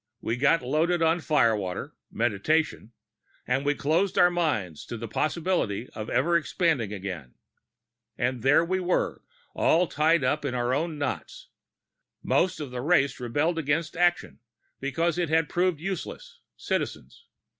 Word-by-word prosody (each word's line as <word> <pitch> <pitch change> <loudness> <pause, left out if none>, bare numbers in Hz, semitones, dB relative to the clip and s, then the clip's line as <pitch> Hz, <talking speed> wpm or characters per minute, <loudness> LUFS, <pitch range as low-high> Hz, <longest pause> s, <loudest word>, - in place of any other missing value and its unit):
We 115 - -2
got 145 +3 +3
loaded 165 +6 +1
on 165 +2 +3
firewater 115 - 0 0.2
Meditation 120 +3 0 0.5
and 130 +2 0
we 145 +1 +1
closed 170 +8 0
our 175 0 +6
minds 130 - -1
to 120 - -5
the 115 +1 -6
possibility 155 - -1
of 110 0 -6
ever 170 +6 +2
expanding 160 - +1
again. 90 -10 -6 0.8
And 120 0 -1
there 140 +6 +4
we 185 +2 0
were, 180 0 -1 0.3
all 175 +3 +3
tied 155 -1 +2
up 145 +4 0
in 135 -3 -2
our 120 0 0
own 155 +2 -1
knots. 145 -2 -5 0.7
Most 185 +1 +1
of 145 -4 -6
the 125 -1 -4
race 140 -3 +2
rebelled 145 +8 0
against 155 +3 -1
action, 175 0 +1 0.4
because 165 +5 -1
it 175 -3 0
had 160 0 +2
proven 180 -1 +1
useless 190 +1 -6 0.2
Citizens. 65 - -4
150 Hz, 145 wpm, -27 LUFS, 120-170 Hz, 0.8 s, our